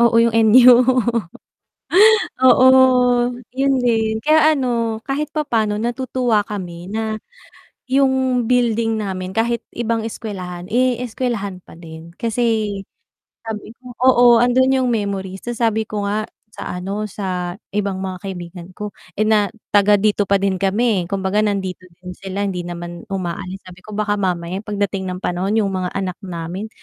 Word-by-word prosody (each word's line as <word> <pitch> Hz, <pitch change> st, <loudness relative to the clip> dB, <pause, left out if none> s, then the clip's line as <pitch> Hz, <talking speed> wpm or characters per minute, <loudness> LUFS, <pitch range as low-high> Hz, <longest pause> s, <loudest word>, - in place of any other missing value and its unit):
Oo, 235 Hz, -1 st, +4 dB
yung 230 Hz, 0 st, +4 dB
NU 230 Hz, +3 st, +7 dB, 1.7 s
oo, 260 Hz, 0 st, +6 dB, 0.9 s
'yon 275 Hz, +1 st, +1 dB
din 220 Hz, -2 st, +1 dB
kaya 310 Hz, 0 st, +5 dB
ano 235 Hz, -4 st, -1 dB
kahit 285 Hz, +2 st, -2 dB
papaano 230 Hz, -9 st, -1 dB
natutuwa 240 Hz, -1 st, 0 dB
kami 180 Hz, -3 st, -6 dB
na 220 Hz, 0 st, -3 dB, 0.7 s
yung 260 Hz, -3 st, +2 dB
building 230 Hz, -2 st, +1 dB
namin 185 Hz, -1 st, -5 dB
kahit 235 Hz, +1 st, +1 dB, 0.2 s
ibang 230 Hz, -1 st, -1 dB
eskuwelahan, 185 Hz, -6 st, -6 dB
eh, 250 Hz, +1 st, +1 dB
eskuwelahan 220 Hz, -6 st, -3 dB
pa -, -, -16 dB
din 165 Hz, 0 st, -12 dB
kasi 225 Hz, -3 st, -1 dB, 0.6 s
sabi 220 Hz, -1 st, -7 dB
ko 245 Hz, 0 st, -14 dB
oo 250 Hz, -1 st, +6 dB
andun 255 Hz, +3 st, +3 dB
yung -, -, +1 dB
memories. 195 Hz, -3 st, -3 dB
So, 240 Hz, -1 st, -5 dB
sabi 220 Hz, -2 st, 0 dB
ko 210 Hz, -1 st, -3 dB
nga 210 Hz, +2 st, -2 dB, 0.3 s
sa -, -, -6 dB
ano 195 Hz, +4 st, -4 dB
sa 180 Hz, -2 st, -4 dB, 0.2 s
ibang 200 Hz, -2 st, -1 dB
mga 185 Hz, -1 st, -5 dB
kaibigan 175 Hz, -2 st, -7 dB
ko, 210 Hz, -1 st, -6 dB, 0.2 s
eh, 215 Hz, -, +1 dB
na 210 Hz, -2 st, +3 dB, 0.3 s
taga 205 Hz, 0 st, +5 dB
dito 205 Hz, 0 st, +1 dB
pa 200 Hz, -, +4 dB
din 195 Hz, -1 st, -1 dB
kami 200 Hz, -2 st, +1 dB
kumbaga 195 Hz, +1 st, 0 dB
nandito 190 Hz, -3 st, -2 dB, 0.2 s
din 180 Hz, -, -6 dB
sila 195 Hz, +2 st, -4 dB
hindi 180 Hz, -2 st, -3 dB
naman 175 Hz, 0 st, -7 dB
umaalis 185 Hz, 0 st, -4 dB
sabi 185 Hz, 0 st, -13 dB
ko 215 Hz, -, -12 dB
baka 210 Hz, -1 st, 0 dB
mamaya 180 Hz, 0 st, -2 dB
pagdating 200 Hz, -2 st, -2 dB
ng 180 Hz, 0 st, -4 dB
panahon 185 Hz, +4 st, -1 dB
yung 200 Hz, -3 st, 0 dB
mga 185 Hz, -1 st, -2 dB
anak 185 Hz, -2 st, -3 dB
namin 180 Hz, +3 st, -5 dB
210 Hz, 150 wpm, -19 LUFS, 190-235 Hz, 1.7 s, NU